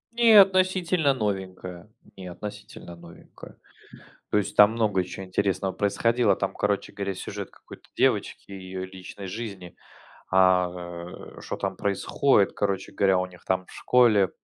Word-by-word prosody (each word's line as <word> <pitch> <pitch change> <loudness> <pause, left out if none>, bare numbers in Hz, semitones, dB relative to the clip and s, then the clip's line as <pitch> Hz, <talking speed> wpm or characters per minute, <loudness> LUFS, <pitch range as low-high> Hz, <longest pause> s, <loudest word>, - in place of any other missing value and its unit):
Не, 230 -3 +7
относительно 185 -5 +2
новенькое. 95 -4 -5 0.2
Не, 95 -1 -9
относительно 105 -2 -9
новенькое. 85 0 -15 0.7
То - - +3
есть, 100 - -3
там 105 +1 +7
много 105 -5 0
чё 95 +2 -8
интересного 95 0 -1
происходило, 115 +5 +1
там, - - -3
короче 105 -1 -1
говоря, 100 -1 -3
сюжет - - -7
какой-то - - -15
девочки - - 0
и 100 - -7
ее 95 0 -6
личной 95 +1 -10
жизни, 95 -3 -7 0.6
а, 95 -1 +4 0.7
э, - - -10
что - - -5
там 95 -2 -3
происходит, 100 +2 +1
короче 100 -2 -2
говоря, 95 -2 +2
у 90 - -1
них, 90 -1 -16
там, 95 0 -1
в - - -16
школе 115 -6 +3
100 Hz, 145 wpm, -25 LUFS, 95-110 Hz, 0.7 s, Не